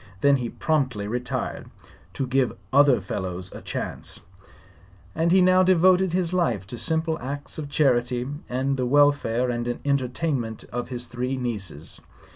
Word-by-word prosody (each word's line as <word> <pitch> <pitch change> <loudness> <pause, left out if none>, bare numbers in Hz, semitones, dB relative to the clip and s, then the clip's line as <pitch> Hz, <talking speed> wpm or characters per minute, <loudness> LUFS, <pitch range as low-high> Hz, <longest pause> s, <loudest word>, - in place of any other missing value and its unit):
Then 140 -1 +5
he 120 -2 -3
promptly 130 -11 -1
retired, 125 +2 -3 0.4
"to 135 - -2
give 130 0 +2
the - - -13 0.2
other 140 -3 +6
fellows 95 -1 -5
a - - -8
chance," - - -5 0.9
and 165 +6 +1
he 190 +1 +6
now 185 0 +5
devoted 185 0 +4
his 180 -1 0
life 120 - +1
to - - -4
simple 160 0 0
acts 140 +4 -5
of 145 -2 -5
charity 125 -4 +1 0.2
and 135 +2 0
the 125 -1 0
welfare 130 -3 +3
and 120 0 -2
entertainment 130 -3 -1
of 120 0 -3
his 125 -1 -3
three 125 +2 -3
nieces. 100 - -5
130 Hz, 150 wpm, -25 LUFS, 120-155 Hz, 0.9 s, other